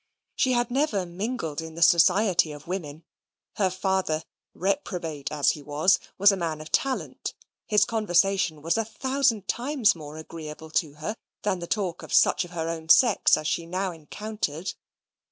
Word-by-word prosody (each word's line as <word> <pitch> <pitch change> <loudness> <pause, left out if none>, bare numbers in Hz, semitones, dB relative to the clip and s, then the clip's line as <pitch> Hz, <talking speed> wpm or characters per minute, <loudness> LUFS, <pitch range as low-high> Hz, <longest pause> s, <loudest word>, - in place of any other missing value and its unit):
She 255 - +2
had 240 0 0
never 245 -8 +1
mingled 175 - -4
in 160 0 -9
the 170 - +2
society 180 0 +4
of 150 0 -10
women: 165 -4 -5 0.5
her 195 -3 +2
father, 185 -4 -1 0.3
reprobate 180 -6 -2
as 145 -2 +3
he 150 - -7
was, 150 +6 +2 0.2
was 200 +2 +7
a - - 0
man 165 -4 -3
of 155 0 -10
talent; 270 -1 -1 0.3
his 210 -1 +4
conversation 195 -7 +1
was 165 +4 +1
a - - +2
thousand 245 -1 0
times 250 -1 +2
more 155 -2 -10
agreeable 160 0 -9
to 155 -2 0
her 155 +9 -5 0.3
than 195 -3 0
the 170 - -6
talk 190 -4 -2
of - - -10
such - - +4
of 175 - -10
her 165 -2 -3
own 160 -1 -5
sex 235 +4 +6
as 155 - -6
she 165 +1 -1
now 185 +2 -2
encountered. 170 0 -5
180 Hz, 170 wpm, -26 LUFS, 160-210 Hz, 0.5 s, was